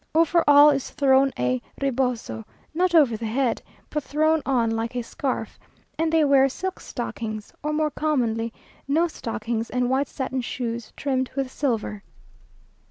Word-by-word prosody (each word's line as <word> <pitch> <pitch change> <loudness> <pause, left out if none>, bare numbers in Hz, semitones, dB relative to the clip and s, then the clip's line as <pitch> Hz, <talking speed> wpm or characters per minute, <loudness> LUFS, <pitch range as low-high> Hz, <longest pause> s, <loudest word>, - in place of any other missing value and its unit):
Over 330 +1 +4
all 290 +1 +8
is 275 -2 -2
thrown 270 -1 +3
a 125 0 0 0.2
reboso, 250 - -1 0.3
not 355 +2 +1
over 280 -8 +5
the 225 +1 -4
head, 245 +2 0 0.3
but 300 - -2
thrown 310 +3 +2
on 240 -4 +2
like 225 +2 -2
a 245 - -1
scarf; 260 +3 -4 0.4
and 320 0 0
they 325 -1 +4
wear 275 -1 +5
silk 375 +7 -4
stockings, 220 -3 -5
or 300 - -2
more 305 0 0
commonly 235 -8 0 0.4
no 320 +5 +3
stockings, 230 -5 -4
and 250 0 0
white 270 +1 +1
satin 260 0 -3
shoes 235 -2 -4
trimmed 260 -2 -1
with 270 -2 -2
silver. 225 -7 -2
265 Hz, 155 wpm, -24 LUFS, 230-295 Hz, 0.4 s, all